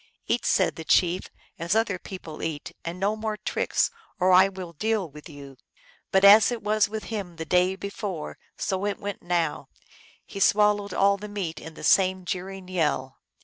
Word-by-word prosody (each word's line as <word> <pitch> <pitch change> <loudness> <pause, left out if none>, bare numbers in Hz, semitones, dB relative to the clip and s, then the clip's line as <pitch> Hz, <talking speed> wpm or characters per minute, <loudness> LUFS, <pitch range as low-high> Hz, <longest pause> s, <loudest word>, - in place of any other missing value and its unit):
" - - -48
Eat," 240 - 0
said 185 - +2
the 160 - -6
chief, 175 +2 +2
" - - -29
as 170 +5 0
other 220 -4 +1
people 170 -5 -9
eat, 160 -2 -5
and 170 +2 -5
no 200 +3 +1
more 215 -1 -3
tricks, - - 0 0.3
or 185 +1 +3
I 185 +1 +7
will 185 -3 -8
deal 215 +2 -1
with 150 +3 -13
you." 140 -3 -11 0.5
But 190 +1 +4
as 210 +3 +8
it 235 -3 -4
was 210 0 +2
with 215 0 -5
him 190 -5 -5
the 160 0 -6
day 180 +2 +2
before, 200 -4 -6 0.2
so 190 -1 -2
it 205 - -2
went 205 -2 -6
now; 170 -3 -1 0.6
he 200 - -8
swallowed 205 0 +3
al] 200 +1 +3
the 210 +1 -8
meat 185 -6 -4
with 160 0 -10
the - - -11
same 185 -1 +3
jeering 185 +1 -5
yell. 150 -7 -1
190 Hz, 190 wpm, -26 LUFS, 170-205 Hz, 0.6 s, as